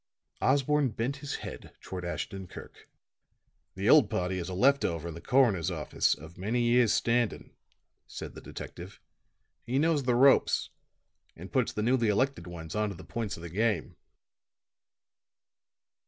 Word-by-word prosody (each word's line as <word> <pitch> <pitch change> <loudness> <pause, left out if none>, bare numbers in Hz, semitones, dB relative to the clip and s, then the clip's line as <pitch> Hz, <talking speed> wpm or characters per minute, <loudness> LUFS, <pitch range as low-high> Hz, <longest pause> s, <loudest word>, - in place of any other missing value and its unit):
Osborne 140 +1 +2
bent 120 +5 -3
his 140 0 -5
head - - -9
toward 90 -1 -7
Ashton 95 +2 -5
Kirk. - - -12 0.9
"The 95 +2 -2
old 130 -5 +7
party 90 +1 -1
is 85 +1 -5
a 90 - -4
left 140 +8 +4
over 85 -1 -2
in - - -6
the 85 - -9
coroner's 105 - +3
office, 80 -5 0
of 80 +3 -13
many 115 +6 0
years' 120 -1 +4
standing," 120 -1 0 0.5
said - - -8
the - - -10
detective. 95 +5 -9 0.6
"He 125 +3 -2
knows 155 0 +2
the 125 -2 +1
ropes 135 +2 +4 0.6
and 90 +4 -10
puts 130 -4 +2
the 105 - -3
newly 120 0 +2
elected 105 -3 0
ones 80 -2 -8
on 105 0 0
to 100 - -6
the - - -11
points 115 -4 -4
of 85 - -11
the 85 - -6
game." 110 +5 -1
110 Hz, 155 wpm, -29 LUFS, 90-130 Hz, 0.9 s, old